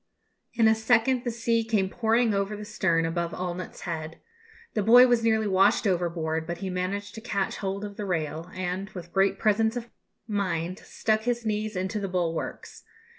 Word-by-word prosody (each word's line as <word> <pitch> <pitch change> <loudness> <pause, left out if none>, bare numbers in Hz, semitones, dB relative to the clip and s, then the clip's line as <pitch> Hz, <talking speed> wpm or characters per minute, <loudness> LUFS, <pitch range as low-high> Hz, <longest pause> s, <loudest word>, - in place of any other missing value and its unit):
In 225 -2 +4
a 220 - +6
second 235 +3 +2
the - - +1
sea 230 0 0
came 215 -4 +1
pouring 225 +2 +2
over 200 +1 -1
the 210 0 -7
stern, 180 -6 +1
above 170 +1 -2
Allnutt's 180 0 -5
head. 160 -2 -5 0.5
The 215 - +1
boy 240 +5 +8
was 240 -2 +2
nearly 220 -1 +2
washed 200 +4 +3
overboard, 165 -4 -1
but 170 0 -3
he 190 0 -4
managed 195 +3 -3
to 220 - -8
catch 200 -4 -2
hold 195 +1 -3
of 205 -1 -9
the 210 - -3
rail, 165 -2 -2
and, 185 +2 -3
with 175 -1 -8
great 195 0 +3
presence 220 +1 +2
of 240 -1 -6 0.4
mind, 185 -4 -2
stuck 220 -1 -1
his 240 0 -1
knees 215 0 -1
into 190 +3 -2
the 195 -1 -3
bulwarks. 170 -3 -3
200 Hz, 180 wpm, -27 LUFS, 180-220 Hz, 0.5 s, boy